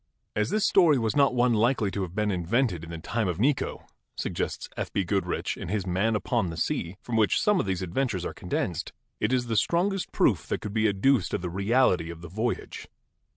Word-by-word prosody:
"As 105 Hz, +1 st, +1 dB
this 215 Hz, -1 st, +1 dB
story 170 Hz, -7 st, +5 dB
was 115 Hz, -3 st, 0 dB
not 140 Hz, -3 st, +4 dB
one 120 Hz, 0 st, +3 dB
likely 115 Hz, -2 st, +2 dB
to 100 Hz, -, -3 dB
have 90 Hz, -1 st, -5 dB
been 105 Hz, -1 st, +1 dB
invented 90 Hz, +1 st, 0 dB
in 85 Hz, -, -9 dB
the 85 Hz, -, -5 dB
time 105 Hz, +6 st, -2 dB
of 90 Hz, -1 st, -2 dB
Necho," 135 Hz, +5 st, 0 dB, 0.3 s
suggests -, -, -3 dB
F. -, -, -4 dB
B. 100 Hz, -, 0 dB
Goodrich 95 Hz, +2 st, -1 dB
in -, -, -7 dB
his 105 Hz, -3 st, -1 dB
'Man 95 Hz, +5 st, +1 dB
Upon 110 Hz, -3 st, 0 dB
the 80 Hz, -, -6 dB
Sea/ 85 Hz, +2 st, -2 dB
from 120 Hz, -2 st, -2 dB
which 110 Hz, -2 st, +3 dB
some 210 Hz, -3 st, +3 dB
of -, -, -1 dB
these 95 Hz, -1 st, -1 dB
adventures 95 Hz, +1 st, -1 dB
are -, -, -3 dB
con -, -, -11 dB
densed, -, -, -2 dB, 0.3 s
"it -, -, 0 dB
is 125 Hz, -1 st, +1 dB
the 115 Hz, -1 st, -2 dB
strongest 185 Hz, -, +1 dB
proof -, -, +2 dB
that -, -, -1 dB
could 105 Hz, -2 st, -6 dB
be 110 Hz, 0 st, +3 dB
adduced 100 Hz, +2 st, +2 dB
of -, -, -4 dB
the 90 Hz, -, -3 dB
reality 100 Hz, -3 st, +2 dB
of 85 Hz, -1 st, -8 dB
the 85 Hz, -, -9 dB
voyage. 110 Hz, +7 st, -3 dB
105 Hz, 225 wpm, -27 LUFS, 90-125 Hz, 0.3 s, story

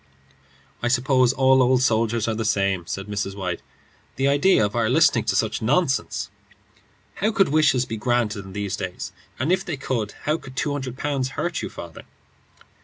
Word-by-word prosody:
"I 120 Hz, -, 0 dB
suppose 130 Hz, 0 st, +3 dB
all 130 Hz, 0 st, +4 dB
old 130 Hz, 0 st, +3 dB
soldiers 115 Hz, -1 st, +1 dB
are 115 Hz, -, 0 dB
the 115 Hz, +1 st, -2 dB
same," 100 Hz, -5 st, 0 dB
said 95 Hz, +3 st, -4 dB
Mrs. 105 Hz, -2 st, -3 dB
White. 90 Hz, -3 st, -3 dB, 0.5 s
"The 135 Hz, +1 st, +1 dB
idea 145 Hz, -, +4 dB
of 105 Hz, -, -4 dB
our 115 Hz, -2 st, +1 dB
listening -, -, +4 dB
to -, -, 0 dB
such -, -, 0 dB
nonsense! 135 Hz, +4 st, 0 dB, 0.9 s
How 215 Hz, +2 st, +1 dB
could 195 Hz, -6 st, +3 dB
wishes 145 Hz, -4 st, +3 dB
be 110 Hz, -, -5 dB
granted 110 Hz, -3 st, 0 dB
in 95 Hz, -1 st, -11 dB
these 100 Hz, -1 st, -2 dB
days? 95 Hz, -2 st, -5 dB, 0.3 s
And 135 Hz, +7 st, 0 dB
if 185 Hz, -, +2 dB
they 165 Hz, -5 st, -4 dB
could, 115 Hz, -6 st, -2 dB
how 150 Hz, +2 st, +1 dB
could 130 Hz, -1 st, -12 dB
two 145 Hz, -, -1 dB
hundred 130 Hz, -3 st, -5 dB
pounds 140 Hz, -3 st, -1 dB
hurt 175 Hz, -1 st, -1 dB
you, -, -, -4 dB
father?" 85 Hz, -2 st, -9 dB
125 Hz, 180 wpm, -23 LUFS, 105-135 Hz, 0.9 s, all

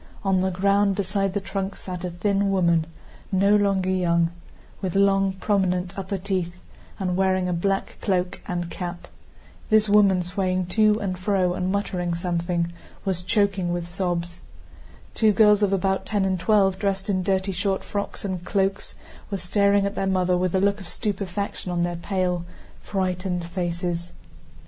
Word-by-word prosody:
On 190 Hz, -2 st, +2 dB
the 190 Hz, -, +1 dB
ground, 200 Hz, +2 st, +2 dB
beside 195 Hz, 0 st, -1 dB
the -, -, +2 dB
trunks, 195 Hz, +1 st, -4 dB
sat 180 Hz, -1 st, -5 dB
a 180 Hz, -, -2 dB
thin 195 Hz, +3 st, 0 dB
woman 170 Hz, -4 st, +2 dB, 0.4 s
no 200 Hz, +2 st, +4 dB
longer 195 Hz, -2 st, +2 dB
young, 170 Hz, -2 st, +2 dB, 0.5 s
with 185 Hz, -2 st, -3 dB
long, 195 Hz, -1 st, +3 dB
prominent 185 Hz, -2 st, 0 dB
upper 195 Hz, 0 st, -3 dB
teeth, 185 Hz, -2 st, -2 dB, 0.4 s
and 180 Hz, -2 st, -1 dB
wearing 185 Hz, -1 st, +2 dB
a 180 Hz, -, 0 dB
black 195 Hz, +3 st, -1 dB
cloak 185 Hz, -3 st, -1 dB
and 175 Hz, -1 st, -3 dB
cap. 175 Hz, -1 st, -6 dB, 0.6 s
This 215 Hz, -1 st, +4 dB
woman, 200 Hz, -3 st, +4 dB
swaying 185 Hz, 0 st, -1 dB
to 215 Hz, -1 st, +4 dB
and 185 Hz, -4 st, -3 dB
fro 185 Hz, -2 st, +1 dB
and 185 Hz, +1 st, -1 dB
muttering 180 Hz, -4 st, -1 dB
something, 170 Hz, 0 st, -1 dB, 0.3 s
was 185 Hz, -2 st, -1 dB
choking 195 Hz, -2 st, +1 dB
with 175 Hz, -1 st, -2 dB
sobs. 175 Hz, -1 st, -3 dB, 0.7 s
Two 220 Hz, -1 st, +4 dB
girls 210 Hz, -1 st, +5 dB
of 205 Hz, -2 st, +3 dB
about 190 Hz, 0 st, 0 dB
ten 205 Hz, -3 st, +1 dB
and 190 Hz, -1 st, 0 dB
twelve, 195 Hz, 0 st, +3 dB
dressed 195 Hz, -1 st, -1 dB
in 190 Hz, -2 st, +1 dB
dirty 190 Hz, +1 st, 0 dB
short 190 Hz, +1 st, -1 dB
frocks 200 Hz, 0 st, -4 dB
and 185 Hz, -3 st, -3 dB
cloaks, 195 Hz, +1 st, -1 dB, 0.3 s
were 200 Hz, -, -2 dB
staring 200 Hz, +2 st, +2 dB
at 200 Hz, -, -1 dB
their 195 Hz, -, -1 dB
mother 185 Hz, -1 st, +2 dB
with 180 Hz, 0 st, 0 dB
a -, -, +4 dB
look 200 Hz, +1 st, +1 dB
of 185 Hz, -, -10 dB
stupefaction 200 Hz, -3 st, -3 dB
on 175 Hz, -1 st, 0 dB
their 175 Hz, 0 st, -1 dB
pale 180 Hz, -1 st, -1 dB, 0.4 s
frightened 185 Hz, -2 st, -2 dB
faces. 175 Hz, 0 st, -3 dB
190 Hz, 165 wpm, -24 LUFS, 180-200 Hz, 0.7 s, girls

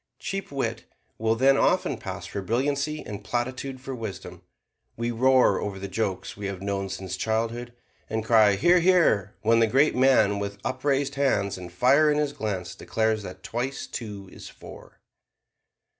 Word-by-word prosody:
Cheap 195 Hz, -4 st, -5 dB
wit 115 Hz, -5 st, -3 dB, 0.3 s
will 110 Hz, 0 st, +2 dB
then 135 Hz, +3 st, +4 dB
often -, -, +2 dB
pass -, -, -7 dB
for 100 Hz, -, -5 dB
brilliancy, 140 Hz, +8 st, -1 dB
and 105 Hz, -2 st, -7 dB
platitude 130 Hz, +2 st, -3 dB
for 135 Hz, +1 st, -6 dB
wisdom. 95 Hz, -6 st, -7 dB, 0.6 s
We 115 Hz, +1 st, -1 dB
roar 130 Hz, +2 st, +4 dB
over 100 Hz, -2 st, -4 dB
the 100 Hz, +1 st, -5 dB
jokes 100 Hz, -1 st, -3 dB
we 100 Hz, 0 st, -5 dB
have 100 Hz, -2 st, -5 dB
known 100 Hz, 0 st, -3 dB
since 95 Hz, -1 st, -5 dB
childhood, 115 Hz, +4 st, -2 dB, 0.4 s
and 110 Hz, 0 st, -2 dB
cry 110 Hz, -3 st, +5 dB
"Hear, 175 Hz, -, +4 dB
hear!" 165 Hz, -, +3 dB
when 115 Hz, +1 st, +4 dB
the 115 Hz, -, +4 dB
great 135 Hz, +7 st, +3 dB
man 125 Hz, -6 st, +4 dB
with 100 Hz, 0 st, -4 dB
upraised 135 Hz, +1 st, 0 dB
hands 105 Hz, -8 st, +1 dB
and 90 Hz, -1 st, -9 dB
fire 140 Hz, -, +4 dB
in 150 Hz, -, +2 dB
his 150 Hz, -1 st, 0 dB
glance 100 Hz, -9 st, -4 dB
declares 110 Hz, +2 st, -1 dB
that 95 Hz, -1 st, -9 dB
twice 125 Hz, +4 st, -3 dB
two 105 Hz, -5 st, -7 dB
is -, -, -10 dB
four. -, -, -14 dB
115 Hz, 165 wpm, -26 LUFS, 100-135 Hz, 0.6 s, cry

